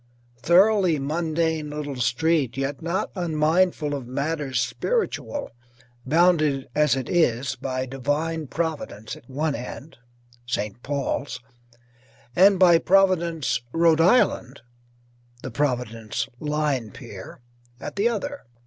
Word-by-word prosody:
Thoroughly 185 +1 +4
mundane 160 +1 -1
little 145 -2 -5
street, 150 0 +1
yet 135 +2 -2
not 170 +5 -2
unmindful 160 -2 +1
of 135 -4 -5
matters 140 +1 -2
spiritual, 450 -11 -2 0.6
bounded 155 -3 +3
as 150 -1 +3
it 130 -2 -3
is 130 -6 +1
by 130 -1 -3
divine 145 +5 -2
Providence 150 -9 -4
at 120 - -17
one 150 +3 -1
end 135 +3 -8 0.5
(St. 110 -1 -3
Paul's) 140 0 -3 1.0
and 195 +2 +6
by 175 -3 +6
Providence, 170 -8 +2
R. 165 0 +5
I. 190 +9 +6 1.2
(the - - -5
Providence 120 -4 -2
Line 150 -6 -1
pier) 105 - -11 0.4
at - - -7
the 205 +4 +2
other. 285 +6 -4
150 Hz, 110 wpm, -24 LUFS, 135-170 Hz, 1.2 s, and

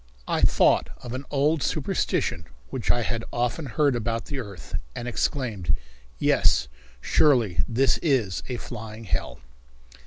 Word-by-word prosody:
I - - +1
thought - - +4
of 120 - -6
an 130 +2 -4
old 150 +2 +2
superstition 85 -9 0 0.2
which - - -3
I 120 - +3
had 115 -1 -2
often 125 +5 -1
heard 140 +3 +2
about 115 0 -2
the 140 - -4
earth, 100 -7 -8 0.2
and 120 - -5
exclaimed: 115 - -1 0.4
"Yes, 65 - +3 0.3
surely, 120 - +3
this 130 +4 +3
is 125 - +1
a 125 - -2
flying 110 0 -7
hell!" 100 - -3
120 Hz, 135 wpm, -26 LUFS, 110-135 Hz, 0.4 s, thought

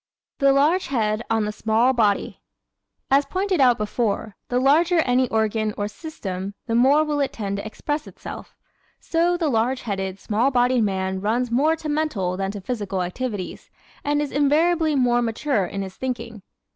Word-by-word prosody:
The 275 -1 +5
Large 300 +7 +3
Head 215 -4 0
on 225 -1 +1
the 210 - -2
Small 225 +4 +2
Body 215 -5 0 0.7
¶ - - +7
As 280 - +4
pointed 375 -4 0
out 250 -2 +5
before, 210 -1 -2
the 245 - -1
larger 325 +7 +4
any 250 -2 +2
organ 220 -1 0
or 205 - -1
system 200 - -6
the 230 - -3
more 270 +6 +5
will 300 -1 -1
it 280 - 0
tend 200 -2 -4
to 200 - -5
express 295 +7 -4
itself. - - -9 0.4
So, 345 +1 +1
the 335 -3 0
large 250 0 +1
headed, 195 -3 -3
small 220 +6 +1
bodied 245 -2 +2
man 190 -1 -2
runs 235 +4 0
more 295 +7 +3
to 320 - -7
mental 295 -13 -1
than 195 +1 -2
to 205 0 -6
physical 200 -4 -3
activities, 205 +1 -5 0.3
and 290 0 +1
is 290 - -5
invariably 310 +2 +2
more 245 -2 +3
mature 230 -3 0
in 195 +2 -4
his 190 0 -9
thinking. 230 -4 -5
240 Hz, 175 wpm, -23 LUFS, 210-290 Hz, 0.7 s, ¶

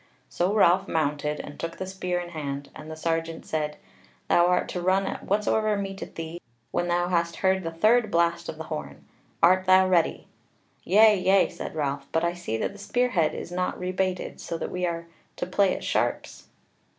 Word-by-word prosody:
So 180 +3 0
Ralph 195 -2 +4
mounted 150 -1 -1
and 145 - -10
took 165 0 -4
the 190 - -4
spear 185 -1 -2
in 175 0 -6
hand; 140 -4 -5
and 155 0 -9
the 160 - -6
sergeant 165 0 -2
said: 150 -1 -2 0.5
"Thou 175 0 +5
art 180 0 +2
to 180 - -3
run 190 +2 +2
at - - -5
whatsoever 210 +1 +1
meeteth 195 -1 -6
thee 165 +1 -6 0.3
when 175 - 0
thou 175 0 +1
hast 170 -1 0
heard 190 0 +3
the 165 - -3
third 215 +7 +3
blast 170 -2 +1
of - - -6
the - - -5
horn. - - -7 0.4
Art 185 +2 +5
thou 185 0 +6
ready?" 175 -3 +1 0.6
"Yea, 215 +3 +6
yea," 190 +1 +4
said - - -7
Ralph; 140 -2 -2
"but 165 - +1
I 170 0 +1
see 175 -11 -4
that - - -2
the 205 - -13
spear 245 +5 0
head 165 -8 +1
is - - -6
not 180 +1 -1
rebated, 185 0 -2
so 165 - -4
that - - -5
we 180 0 -1
are 170 0 -4 0.3
to - - -3
play 190 +1 +2
at - - -7
sharps." - - -2
175 Hz, 200 wpm, -26 LUFS, 165-190 Hz, 0.6 s, thou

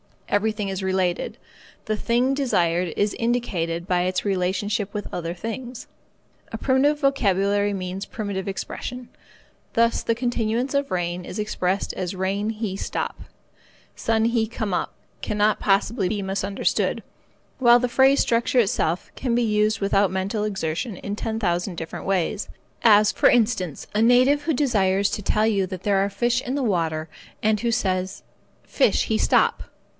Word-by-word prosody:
Everything 210 -1 0
is 190 0 -3
related. 185 -2 -1 0.5
The 215 0 -1
thing 245 +4 +1
desired 180 - +1
is 205 0 +1
indicated 185 -9 -1
by 180 -1 +1
its 185 0 -1
relationship 200 +2 -1
with 210 -1 -5
other 170 -1 -3
things. 230 +6 -6 0.7
A - - -2
primitive 275 +5 +2
vocabulary 205 -6 +2
means 185 0 -4
primitive 200 -3 -4
expression, 245 +5 -5 0.6
thus, 230 0 +2
the 230 - 0
continuance 240 +1 -1
of 280 0 0
rain 175 0 -2
is 185 - -7
expressed 200 -2 -1
as 185 +1 -4
rain 195 +3 -1
he 215 -3 -3
stop. - - -3 0.8
Sun 220 -1 +1
he 230 -1 +1
come 215 -3 -3
up - - -1 0.3
cannot 210 0 +1
possibly 200 0 +1
be 205 +1 -2
misunderstood, 195 +1 -1 0.6
while 240 -2 +7
the 245 0 -1
phrase 265 +3 +4
structure 235 +2 +2
itself 185 -6 0
can 245 -3 -1
be 240 - +2
used 215 -1 +1
without 200 0 +3
mental 195 +3 -2
exertion 190 +2 -3
in 200 +1 -5
ten 220 +1 -3
thousand 175 -2 -1
different 165 -1 -6
ways, 195 +2 0 0.4
as, 210 -2 +6
for - - +4
instance, 215 - +1
a 210 - +1
native 255 +5 +4
who 320 - 0
desires 200 -8 +2
to - - -3
tell 215 +2 +1
you 200 -4 +1
that 185 -1 -7
there 200 -1 +2
are 195 +1 +2
fish 240 +5 0
in 265 -1 -3
the 285 - -1
water 165 -7 0 0.4
and 215 0 +2
who 235 +1 0
says 185 -4 -1 0.4
fish - - +2
he - - 0
stop. - - +2
205 Hz, 155 wpm, -23 LUFS, 190-235 Hz, 0.8 s, while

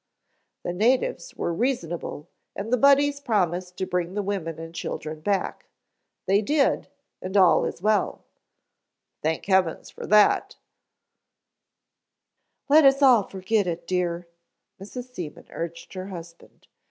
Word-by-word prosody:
"The 175 - -3
natives 260 - 0
were 170 - -2
reasonable 175 - -3 0.3
and 215 +5 -4
the - - +5
Buddies 280 +2 +4
promised 180 - -1
to 190 - -1
bring 180 0 -2
the 205 - -1
women 190 -5 -3
and 165 0 -8
children 155 -2 -5
back. 200 +3 -2 0.6
They 195 +2 +3
did, 285 +6 +1 0.3
and 190 +2 -2
all 185 -3 +5
is - - -5
well 210 -2 +1 0.5
" - - -57
"Thank 160 +1 -1
heavens 190 -4 +1
for - - -8
that 210 0 +4 1.5
" - - -55
"Let 305 +2 +6
us 275 +1 +5
all 250 -5 +7
forget 195 +1 -1
it, 170 0 -4
dear," 175 -1 -1 0.5
Mrs. 250 +5 -8
Seaman 165 -9 -7
urged 170 0 -6
her 185 0 -6
husband. 170 -3 -11
190 Hz, 135 wpm, -25 LUFS, 170-230 Hz, 1.5 s, all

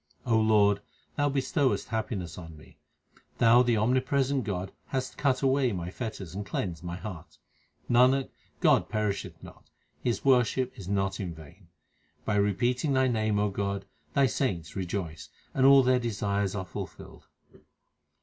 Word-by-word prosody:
Lord, 110 -3 +3 0.3
Thou 145 0 +1
bestowest 140 +1 0
happiness 105 -7 -3
on 80 -3 -10
me; 75 - -18 0.6
Thou 115 +1 +6
the 120 -2 +2
omnipresent 130 +4 +1
God 95 -2 -3 0.2
hast 130 -1 -3
cut 140 -2 0
away 135 -2 +3
my 90 -1 -4
fetters 105 -6 -6
and 100 +2 -4
cleansed 90 -4 -4
my 85 0 -4
heart. 95 -4 -9 0.5
Nanak, 130 +2 +4 0.3
God - - +4
perisheth 105 -2 -3
not - - -14 0.3
His 120 +1 -2
worship 130 -1 +3
is 100 -7 -9
not 95 -1 -1
in 90 -4 -4
vain. 85 +4 -15 0.6
By 105 - +1
repeating 120 - +1
Thy 130 -1 +3
name, 110 -3 0
O 105 0 +1
God, 100 0 -3 0.3
Thy 140 - +5
saints 95 - -2
rejoice, 85 -5 -4 0.2
And 135 0 +4
all 135 -1 +8
their 130 0 +3
desires 100 -4 -1
are 95 -2 -3
fulfilled. 95 -1 -9
105 Hz, 145 wpm, -28 LUFS, 95-130 Hz, 0.6 s, all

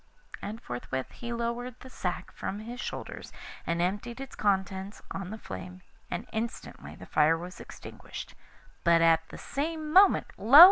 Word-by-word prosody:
And 215 +2 -4
forthwith 130 - -4
he 235 -1 -6
lowered 235 +1 -2
the 260 - -9
sack 180 -3 -3
from 195 - -4
his 235 +3 -6
shoulders - - -5 0.4
and 170 +1 +2
emptied 205 +7 -1
its 270 -1 -7
contents 195 0 0
on 190 -2 -4
the 220 - -5
flames, 185 -3 -7 0.3
and - - -2
instantly 225 +2 -4
the - - -10
fire 155 +2 +4
was 180 +3 -7
extinguished; - - -8 0.5
but 170 -1 +6
at 165 0 +5
the - - -8
same 310 +1 -2
moment 390 +1 +8
lo! 240 +9 +9
205 Hz, 155 wpm, -30 LUFS, 175-240 Hz, 0.5 s, lo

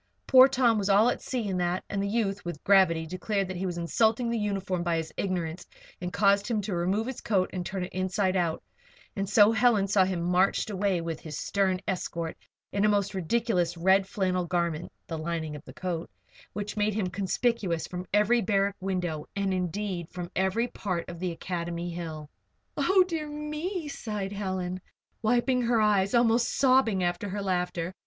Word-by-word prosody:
Poor 260 0 +8
Tom 245 -5 +3
was 200 0 -1
all 205 +4 +5
at - - -2
sea 245 -5 -3
in 190 -2 -1
that, 175 +1 0
and 200 - -2
the 200 - -1
youth, 200 -2 -1
with 175 -4 -6
gravity, 185 -5 +4
declared 190 +4 -2
that 185 - -5
he 185 +2 -2
was 175 -1 -4
insulting 220 +7 +1
the 235 - 0
uniform 195 -3 -1
by 170 -1 0
his 160 0 -4
ignorance 180 -3 -3 0.3
and 180 0 -3
caused 200 0 +3
him 230 -3 0
to 205 -1 -3
remove 185 +5 0
his 260 0 -5
coat 190 -4 +1
and 180 -1 -3
turn 190 +1 -3
it 180 - -7
inside 185 +1 0
out; 170 -3 0 0.5
and 195 -1 -2
so 210 -1 +6
Helen 225 -2 +4
and - - +1
Ruth 195 - -3
saw 195 -2 +5
him 185 -2 -1
marched 180 +4 +2
away 195 -2 0
with 165 -1 -4
his 150 -2 -7
stern 190 -2 0
escort, 170 -3 -3 0.4
in 200 - 0
a 210 - +5
most 205 -1 +1
ridiculous 185 -2 0
red 190 +3 +3
flannel 185 -4 0
garment 170 -1 -1
(the 165 -2 -5
lining 160 -1 -3
of 150 - -9
the - - -10
coat) 175 -3 -4 0.4
which 205 0 -4
made 210 -1 +1
him 215 -3 0
conspicuous 190 0 -1
from 180 0 -6
every 210 +4 +3
barrack 200 -1 +1
window 180 -5 -3
and, 195 -1 0
indeed, 185 -1 -3
from 175 -1 -7
every 190 +6 +1
part 185 -8 -4
of 170 - -10
the 180 0 -2
academy 170 0 -4
hill. 160 -3 -6 0.5
"Oh, 375 0 +4
dear 320 -4 -3
me!" 300 +4 -4
sighed 210 -8 -4
Helen, 185 -2 -3 0.4
wiping 245 +3 +2
her 235 -1 +2
eyes 205 -1 +3
and 235 - +6
almost 235 0 +3
sobbing 255 -8 +3
after 175 +3 -1
her 200 +1 -3
laughter. 180 -2 -1
190 Hz, 195 wpm, -28 LUFS, 175-210 Hz, 0.5 s, Poor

